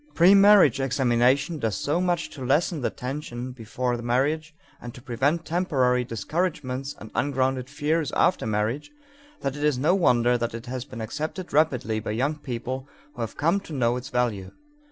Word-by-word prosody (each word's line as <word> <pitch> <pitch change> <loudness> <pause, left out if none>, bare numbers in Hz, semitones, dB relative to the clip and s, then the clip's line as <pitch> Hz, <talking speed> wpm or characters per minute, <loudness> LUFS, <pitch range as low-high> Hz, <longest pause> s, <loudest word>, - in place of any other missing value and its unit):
The - - -30
premarriage 195 -2 +6
examination 135 +4 +2
does 115 -6 -1
so 145 - 0
much 175 -2 -1
to 135 - -8
lessen 150 +4 +1
the - - 0
tension 125 -2 -5
before 125 +1 -3
marriage 150 +6 0 0.3
and 120 -1 -8
to - - -10
prevent 140 +7 0
temporary 135 -8 +1
discouragements 135 - -3
or 110 +1 -10
ungrounded 130 -1 0
fears 150 +1 -1
after 180 - +2
marriage 110 +6 -1 0.5
that 135 0 -2
it 145 - -5
is 150 -3 +2
no 150 +7 +3
wonder 125 -9 +3
that 115 -1 -2
it 115 +1 -7
has 130 0 -5
been 130 -5 -8
accepted 155 - -5
rapidly 125 -8 +2
by 110 - -6
young 135 +8 0
people 130 0 -5 0.3
who 120 - -7
have 115 - -5
come 165 +7 +2
to 165 - -11
know 120 -3 +1
its 125 +1 -6
value. 110 -6 -1
130 Hz, 175 wpm, -25 LUFS, 120-155 Hz, 0.5 s, premarriage